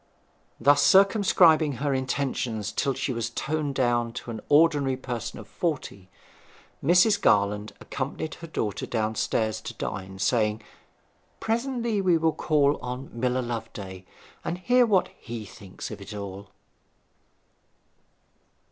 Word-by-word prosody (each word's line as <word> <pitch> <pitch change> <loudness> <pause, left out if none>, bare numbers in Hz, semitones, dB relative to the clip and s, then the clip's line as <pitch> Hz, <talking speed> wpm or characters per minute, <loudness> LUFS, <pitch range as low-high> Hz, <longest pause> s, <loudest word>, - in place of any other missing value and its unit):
Thus 145 +1 +5
circumscribing 185 -6 +5
her 140 +3 -1
intentions 130 -5 -2
till 135 -2 0
she 135 0 -2
was 115 0 -2
toned 145 +3 -2
down 120 -2 +1
to 120 - -6
an 110 -2 -6
ordinary 145 -3 +4
person 125 -3 -5
of 110 - -10
forty, 120 - -4 0.7
Mrs. 180 +7 +4
Garland 105 - +2
accompanied 140 +3 -4
her 165 - -7
daughter 110 -10 -3
downstairs 110 -1 -1
to - - -7
dine, 95 -1 -5
saying, 110 +1 +1 0.8
'Presently 235 -2 -1
we 180 -3 +4
will 160 0 +2
call 145 -2 +2
on 125 +2 -6
Miller 125 +2 0
Loveday, 110 -6 -6 0.4
and 170 - -3
hear 245 +6 +3
what 195 -4 +3
he 115 -3 -7
thinks 105 -5 -9
of - - -8
it 100 +2 -8
all.' 100 0 -7
130 Hz, 125 wpm, -26 LUFS, 110-160 Hz, 0.8 s, Thus